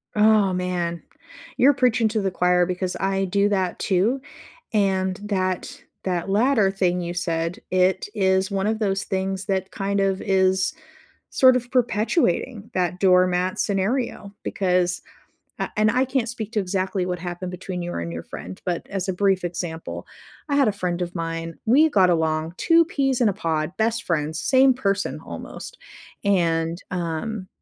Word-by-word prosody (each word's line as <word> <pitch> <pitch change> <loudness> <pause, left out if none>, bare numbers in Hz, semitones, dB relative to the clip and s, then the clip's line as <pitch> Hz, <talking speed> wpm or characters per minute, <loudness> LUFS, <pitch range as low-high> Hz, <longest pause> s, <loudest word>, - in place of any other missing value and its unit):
Oh, 210 -2 +4
man. 175 -2 -2 0.6
You're 280 +3 +6
preaching 235 -3 +2
to 215 -1 -1
the 190 -1 -1
choir 180 0 +3
because 180 0 -3
I 195 0 0
do 200 +2 +2
that 190 -3 -1
too. 215 +8 +1 0.5
And 190 -2 +1
that 185 -3 -2 0.2
that 180 0 -2
latter 215 -1 +3
thing 180 -2 0
you 175 0 -3
said, 165 -1 -2
it 185 +1 +2
is 190 -1 +1
one 195 +1 0
of 220 0 0
those 195 -1 0
things 190 0 -2
that 190 -1 -2
kind 200 0 -1
of 195 -1 0
is 190 +3 +2 0.6
sort 255 -1 +6
of 245 -1 -3
perpetuating 230 - 0
that 180 0 -1
doormat 185 -1 +3
scenario 200 +1 -1
because, 180 -2 0 0.6
uh - - -2
and 215 0 +4
I 255 +4 +2
can't 260 -2 -1
speak 225 -2 -5
to 215 - +1
exactly 190 0 -1
what 180 -1 -3
happened 175 +1 -5
between 180 0 -5
you 175 - -4
and 85 0 -4
your 85 0 -5
friend, 95 +1 -9
but, 175 -2 -2
as 195 -1 -3
a - - +1
brief 190 -1 +1
example, 170 -2 -5 0.4
I 285 - 0
had 275 -6 +4
a - - +1
friend 180 -2 -2
of 175 0 -4
mine, 165 -1 -4
we 300 +7 +5
got 190 -7 +4
along, 160 0 0
two 330 -1 +4
peas 270 -6 0
in 235 - +4
a 200 - 0
pod, 160 -3 -1
best 230 +1 0
friends, 155 -1 -1
same 265 0 +5
person 200 -5 -1
almost. - - -8 0.5
And, 170 -3 +1
um, 185 +4 -3
190 Hz, 165 wpm, -23 LUFS, 180-215 Hz, 0.6 s, You're